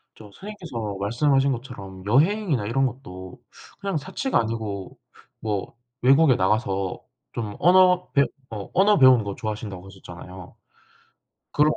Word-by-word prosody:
저 110 - -13
선생님께서 120 - -7
말씀하신 135 +6 +2
것처럼 100 -7 -9
여행이나 150 - +2
이런 135 +5 +1
것도 95 -7 -7 0.4
그냥 195 -5 -2
사치가 190 - -1
아니고 110 -4 -4 0.4
뭐 105 0 -3 0.3
외국에 135 +1 +5
나가서 95 -1 0 0.3
좀 105 -3 -4
언어 180 +1 +5
배 140 -1 +5 0.3
어 105 -3 -7
언어 200 +3 +4
배우는 130 -5 +6
거 100 -1 -4
좋아하신다고 105 -5 -5
하셨잖아요. 90 -1 -11 1.0
그리고 150 +1 +3
115 Hz, 310 characters per minute, -24 LUFS, 100-150 Hz, 1.0 s, 배우는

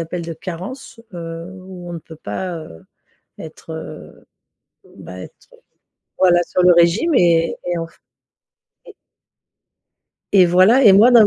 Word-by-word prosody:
appellent 170 +1 -5
de 165 0 -6 0.2
«carence», 210 +8 -8
heu, 165 0 -7
où 185 -1 -11
on - - -6
ne 170 - -5
peut 160 +1 -14
pas, 170 - -5
heu, 155 - -11 0.5
être, 160 +1 -11
heu, 160 - -10 0.7
bah, - - -10
être, - - -13
heu, - - -19 0.6
voilà, 175 -2 +4
sur 180 - -1
le 180 - +6
régime 175 - +3
et 165 -6 +2
et 175 -1 -2
enf 165 0 -8 0.9
et 450 - -14 1.4
et 185 -3 +6
voilà, 185 +10 +4
et 200 - +8
moi 215 +6 +6
dans 230 -4 +7
175 Hz, 150 wpm, -19 LUFS, 165-190 Hz, 1.4 s, et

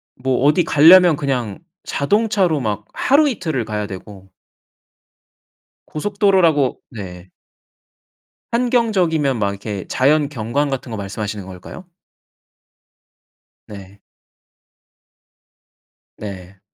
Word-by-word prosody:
뭐 130 0 -1
어디 150 +5 +4
가려면 165 +2 +6
그냥 125 -8 -3 0.2
자동차로 195 -1 +1
막 105 -3 -3
하루 290 +2 +3
이틀을 160 - -3
가야 105 -1 -4
되고 95 0 -11 1.6
고속도로라고 180 -6 +1 0.2
네. 95 -4 -9 1.2
환경적이면 195 - +1
막 100 -1 +1
이렇게 100 -1 -6
자연 145 +3 +2
경관 140 +2 -2
같은 130 -2 -4
거 110 - -4
말씀하시는 100 0 -5
걸까요? 95 - -11 1.8
네. 100 -1 -12 2.2
네. 95 -2 -9
130 Hz, 195 characters per minute, -19 LUFS, 105-170 Hz, 2.2 s, 가려면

